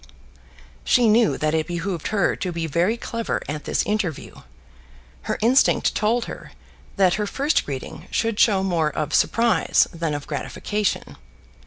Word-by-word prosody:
She 245 -2 +3
knew 220 +1 +3
that 155 0 0
it 160 -1 0
behoved 175 -1 -3
her 205 -2 +1
to 180 - -3
be 165 -1 -3
very 170 +9 +1
clever 230 -1 -3
at 150 +1 -5
this - - 0
interview. 205 -8 -2 1.0
Her - - 0
instinct 255 +4 +3
told 230 +3 +1
her - - -9 0.4
that 190 -3 +3
her 205 - -1
first 280 +8 0
greeting 135 -2 -7
should 225 -2 -1
show 195 -4 +4
more 170 -5 +1
of 150 +1 -4
surprise 230 -1 +3
than 165 -3 -2
of 145 - -6
gratification. 205 +7 -3
190 Hz, 150 wpm, -23 LUFS, 160-225 Hz, 1.0 s, show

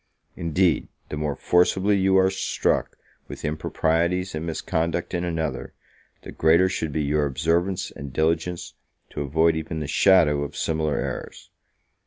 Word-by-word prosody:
Indeed, 85 +1 +1 0.2
the - - -4
more 75 -1 -2
forcibly 95 +6 +2
you 95 0 +3
are 95 0 +4
struck 95 - -1 0.3
with - - -8
improprieties 80 +4 0
and 80 +2 -4
misconduct 80 +2 -2
in 90 -1 -1
another, 80 -5 -3 0.5
the - - -8
greater 80 +4 +4
should 80 -4 -3
be 75 +1 -1
your 75 +1 +1
observance 85 +6 0
and 70 -1 -8
diligence 80 +4 -1 0.4
to - - -4
avoid 80 +4 +2
even 80 0 -4
the 75 - -3
shadow 75 -1 +4
of 70 - -5
similar 80 -2 -1
errors. - - -6
80 Hz, 145 wpm, -24 LUFS, 75-90 Hz, 0.5 s, are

